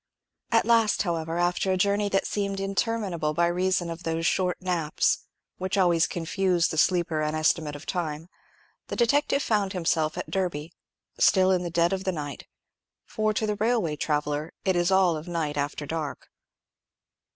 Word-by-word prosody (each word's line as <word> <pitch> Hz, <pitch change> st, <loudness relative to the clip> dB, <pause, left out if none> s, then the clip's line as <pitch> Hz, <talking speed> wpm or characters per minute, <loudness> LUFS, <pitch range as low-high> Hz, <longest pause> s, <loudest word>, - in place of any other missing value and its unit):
At 230 Hz, -1 st, +4 dB
last, 225 Hz, -3 st, +3 dB
however, 165 Hz, -2 st, -2 dB
after 175 Hz, +2 st, +1 dB
a 185 Hz, -, +1 dB
journey 200 Hz, +2 st, +1 dB
that 195 Hz, -1 st, +1 dB
seemed 200 Hz, -1 st, -2 dB
interminable 195 Hz, -5 st, -1 dB
by 170 Hz, -, +3 dB
reason 180 Hz, 0 st, 0 dB
of 165 Hz, +1 st, -7 dB
those 165 Hz, -1 st, -2 dB
short 180 Hz, +1 st, +1 dB
naps, 175 Hz, -5 st, 0 dB, 0.3 s
which 185 Hz, +2 st, -2 dB
always 175 Hz, -3 st, +3 dB
confuse 175 Hz, +1 st, 0 dB
the 160 Hz, -, -4 dB
sleeper's 165 Hz, -3 st, +1 dB
estimate 155 Hz, -1 st, +1 dB
of 145 Hz, -, -10 dB
time, 165 Hz, -3 st, -3 dB, 0.6 s
the -, -, -4 dB
detective 280 Hz, +4 st, +2 dB
found 205 Hz, -4 st, 0 dB
himself 165 Hz, -3 st, 0 dB
at -, -, -5 dB
Derby 170 Hz, -4 st, -2 dB, 0.5 s
still 190 Hz, -1 st, +5 dB
in 185 Hz, -1 st, +2 dB
the 175 Hz, -, -3 dB
dead 170 Hz, +2 st, +2 dB
of 190 Hz, 0 st, -2 dB
the 190 Hz, -, 0 dB
night; 145 Hz, -4 st, -6 dB, 0.6 s
for 215 Hz, 0 st, 0 dB
to 215 Hz, +1 st, -1 dB
the 210 Hz, -1 st, -1 dB
railway 220 Hz, -8 st, +1 dB
traveller 150 Hz, +1 st, -1 dB
it 190 Hz, -1 st, +2 dB
is 175 Hz, +1 st, +2 dB
all 190 Hz, -3 st, +4 dB
of 155 Hz, +2 st, -7 dB
night 160 Hz, -4 st, -2 dB
after 145 Hz, +1 st, -3 dB
dark. 155 Hz, -1 st, -5 dB
175 Hz, 165 wpm, -26 LUFS, 160-195 Hz, 0.6 s, still